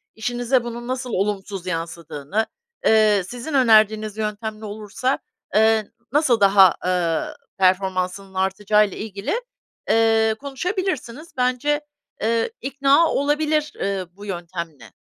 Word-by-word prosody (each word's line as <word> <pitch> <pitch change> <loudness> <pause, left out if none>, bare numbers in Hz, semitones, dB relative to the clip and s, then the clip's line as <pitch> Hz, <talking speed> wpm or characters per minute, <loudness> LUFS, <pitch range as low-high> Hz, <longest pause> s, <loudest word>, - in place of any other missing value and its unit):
işinize 245 +2 0
bunun 240 0 -6
nasıl 255 -1 -3
olumsuz 195 -1 -2
yansıdığını, 165 +2 -3 0.4
eee, 215 -3 +5
sizin 245 +7 -6
önerdiğiniz 215 -4 +4
yöntemle 215 0 -4
olursa, 215 +5 -2 0.4
eee, 220 -1 +3 0.2
nasıl 275 -5 +3
daha, 195 -2 +6
ııı, 175 -3 0 0.2
performansının 190 0 +1
artacağıyla 200 +2 +1
ilgili, 215 - -3 0.5
eee, 225 -1 +3
konuşabilirsiniz. 305 - -3
Bence, 255 +4 +1 0.4
eee, 230 - +1
ikna 275 +4 +3
olabilir, 300 +1 +1
eee, 195 -2 -1
bu 200 +3 -12
yöntemle. 170 - -6
215 Hz, 105 wpm, -22 LUFS, 195-250 Hz, 0.5 s, daha